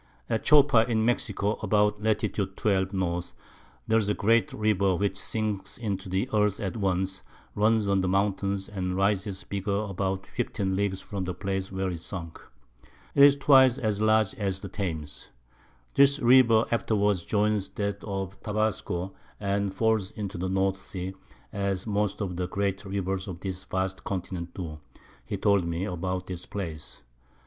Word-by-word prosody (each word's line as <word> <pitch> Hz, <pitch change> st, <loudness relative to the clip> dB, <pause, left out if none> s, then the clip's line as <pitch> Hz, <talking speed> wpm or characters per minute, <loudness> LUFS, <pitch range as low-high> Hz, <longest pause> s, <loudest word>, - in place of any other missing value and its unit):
At 110 Hz, -, 0 dB
Chopa 140 Hz, -6 st, +6 dB
in 110 Hz, -1 st, +2 dB
Mexico, 105 Hz, -3 st, 0 dB
about 105 Hz, 0 st, +2 dB
Lat. 110 Hz, -1 st, +1 dB
12. 95 Hz, -1 st, 0 dB
N. 90 Hz, -3 st, -1 dB, 0.6 s
there's 110 Hz, -2 st, +2 dB
a 105 Hz, -, +1 dB
great 115 Hz, -1 st, +3 dB
River 100 Hz, -3 st, +2 dB
which 100 Hz, +1 st, 0 dB
sinks 105 Hz, -1 st, -2 dB
into 100 Hz, -5 st, -3 dB
the 95 Hz, +6 st, 0 dB
Earth 105 Hz, -2 st, +2 dB
at 95 Hz, 0 st, -3 dB
once, 95 Hz, -2 st, -1 dB, 0.3 s
runs 110 Hz, 0 st, +2 dB
under 100 Hz, -1 st, +2 dB
the 95 Hz, -, 0 dB
Mountains, 100 Hz, 0 st, 0 dB
and 90 Hz, -2 st, -3 dB
rises 100 Hz, 0 st, 0 dB
bigger 100 Hz, +1 st, -2 dB
about 95 Hz, -2 st, -2 dB
15 95 Hz, -1 st, -2 dB
Leagues 95 Hz, -1 st, -1 dB
from 100 Hz, -3 st, -4 dB
the 90 Hz, 0 st, -3 dB
Place 95 Hz, -1 st, -3 dB
where 95 Hz, -1 st, -1 dB
it 85 Hz, -, -5 dB
sunk. 85 Hz, -1 st, -6 dB, 0.7 s
'Tis 140 Hz, 0 st, +7 dB
twice 135 Hz, -3 st, +6 dB
as 105 Hz, -3 st, -1 dB
large 110 Hz, -2 st, +3 dB
as 95 Hz, -2 st, -1 dB
the 100 Hz, -, -6 dB
Thames. 80 Hz, -7 st, -5 dB, 0.6 s
This 140 Hz, 0 st, +5 dB
River 120 Hz, -3 st, +6 dB
afterwards 105 Hz, -5 st, +1 dB
joins 105 Hz, -1 st, +1 dB
that 100 Hz, -1 st, -3 dB
of 95 Hz, -1 st, -5 dB
Tabasco, 105 Hz, -4 st, -1 dB, 0.3 s
and 100 Hz, 0 st, 0 dB
falls 110 Hz, -1 st, +1 dB
into 100 Hz, -3 st, -5 dB
the 95 Hz, +1 st, -2 dB
North 95 Hz, 0 st, 0 dB
Sea, 95 Hz, -1 st, -6 dB, 0.4 s
as 100 Hz, -1 st, -1 dB
most 105 Hz, -1 st, -1 dB
of 90 Hz, -3 st, -3 dB
the 90 Hz, 0 st, -1 dB
great 100 Hz, +1 st, -1 dB
Rivers 95 Hz, 0 st, -2 dB
of 90 Hz, -2 st, -7 dB
this 95 Hz, -1 st, -5 dB
vast 95 Hz, 0 st, -2 dB
Continent 90 Hz, -2 st, -4 dB
do, 80 Hz, -5 st, -6 dB, 0.4 s
he -, -, -4 dB
told 100 Hz, -2 st, +3 dB
me, 85 Hz, +3 st, -2 dB
about 90 Hz, 0 st, -3 dB
this 90 Hz, -1 st, -6 dB
Place. 80 Hz, -12 st, -6 dB
100 Hz, 155 wpm, -27 LUFS, 95-105 Hz, 0.7 s, Tis